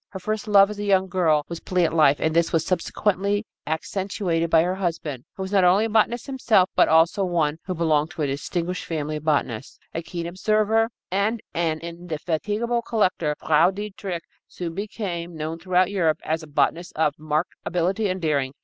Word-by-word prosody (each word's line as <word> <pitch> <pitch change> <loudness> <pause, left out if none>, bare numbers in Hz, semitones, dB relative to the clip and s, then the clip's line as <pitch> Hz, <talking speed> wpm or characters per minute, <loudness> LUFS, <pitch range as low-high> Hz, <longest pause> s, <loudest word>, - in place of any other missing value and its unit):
Her 190 - -7
first 215 +3 -3
love, 200 -1 +6
as 210 - -7
a - - -2
young 190 -2 +3
girl, 165 -5 +2
was 170 -1 -6
plant 180 -3 0
life, 150 -3 +4
and 160 0 0
this 170 0 +3
was 165 -1 +1
subsequently 200 +3 0 0.2
accentuated 170 +1 -1
by 160 0 +5
her 180 +1 0
husband, 165 -8 -3
who 190 - -4
was 190 - -6
not 195 -2 +4
only 185 +5 +5
a - - -2
botanist 225 +2 +2
himself 235 -9 +2
but - - +5
also 165 +5 +4
one 165 -4 0
who 185 - -3
belonged 155 -2 +1
to 155 - -3
a - - +2
distinguished 170 +6 -3
family 155 -2 -3
of 150 - -9
botanists. 135 -6 -1 0.2
A 165 - -2
keen 170 0 -5
observer 215 +5 +1 0.2
and 205 +4 +1
an 160 -2 -1
indefatigable 175 +7 -2
collector, 185 -10 0
Frau 160 +3 +4
Dietrich 195 -3 -5 0.2
soon 170 -2 -6
became 175 -4 -5
known 160 +2 -4
throughout 185 +1 +2
Europe 165 -6 +1
as 160 +1 -1
a 155 - -10
botanist 165 +4 0
of 155 -2 +2
marked 155 +2 -1
ability 190 +4 0
and 185 +1 -2
daring. 140 -5 0
175 Hz, 185 wpm, -24 LUFS, 160-200 Hz, 0.2 s, love